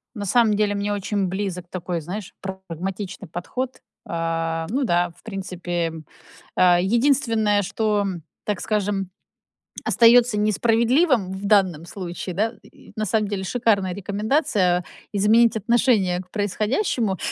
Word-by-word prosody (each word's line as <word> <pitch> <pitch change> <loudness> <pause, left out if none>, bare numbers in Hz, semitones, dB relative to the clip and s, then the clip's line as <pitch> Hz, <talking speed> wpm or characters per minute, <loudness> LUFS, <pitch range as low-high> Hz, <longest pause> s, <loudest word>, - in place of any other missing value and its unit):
На 205 -2 -4
самом 220 +1 +4
деле 205 -1 +1
мне 200 +1 -1
очень 200 -1 -1
близок 185 -2 -4
такой, 175 -1 -4
знаешь, 185 +5 -7
прагматичный 190 0 -6
подход. 250 +10 -4 0.3
Э, 165 -1 -2
ну 265 +6 0
да, 175 -4 +1
в - - -23
принципе, 175 -5 -3 0.6
э, 175 -1 +5
единственное, 225 -2 +2
что, 210 +1 0 0.4
так 210 -2 -2
скажем, 200 -3 -1 0.7
остаётся 235 -1 +5
несправедливым 230 - +2
в 190 +1 -7
данном 185 -6 +3
случае, 180 -1 -6
да, 220 +5 0
и - - -18
на 215 - -1
самом 215 +1 +1
деле 195 -2 -3
шикарная 200 -4 +1
рекомендация 200 - +1 0.3
изменить 220 +3 +4
отношение 220 -5 +2
к 180 -1 -13
происходящему. 210 - 0
200 Hz, 125 wpm, -23 LUFS, 180-220 Hz, 0.7 s, э